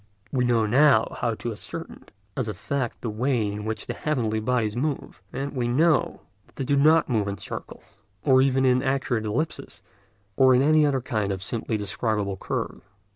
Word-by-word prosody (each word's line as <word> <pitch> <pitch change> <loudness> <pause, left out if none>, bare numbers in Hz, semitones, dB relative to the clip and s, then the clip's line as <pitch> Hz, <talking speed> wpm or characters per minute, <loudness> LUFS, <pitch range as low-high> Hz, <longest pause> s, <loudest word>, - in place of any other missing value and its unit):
We 125 -2 +1
know 115 -2 +2
now 130 +1 +4
how 115 -2 0
to 120 - -4
ascertain 105 - -8 0.3
as 130 -4 -2
a 105 - -4
fact 125 +5 -3
the 115 - -3
way 120 +1 0
in 105 +1 -4
which 110 0 -4
the - - -4
heavenly 115 -8 -1
bodies 110 -2 0
move, 140 +3 -3
and 140 +1 -4
we 120 -2 0
know 155 +7 +2 0.3
that - - -27
they 135 - -3
do 140 +2 +2
not 155 +4 +5
move 110 -5 0
in 100 0 -3
circles, - - -9 0.2
or 130 -2 +5
even 135 0 +2
in 125 0 +4
accurate 135 -4 -1
ellipses, 140 +10 -3 0.5
or 130 -1 +5
in 130 - +4
any 155 0 +4
other 135 -2 0
kind 110 -6 -1
of 95 -1 -4
simply 110 +1 -2
describable 105 0 -1
curve. - - -4
125 Hz, 185 wpm, -25 LUFS, 110-135 Hz, 0.5 s, not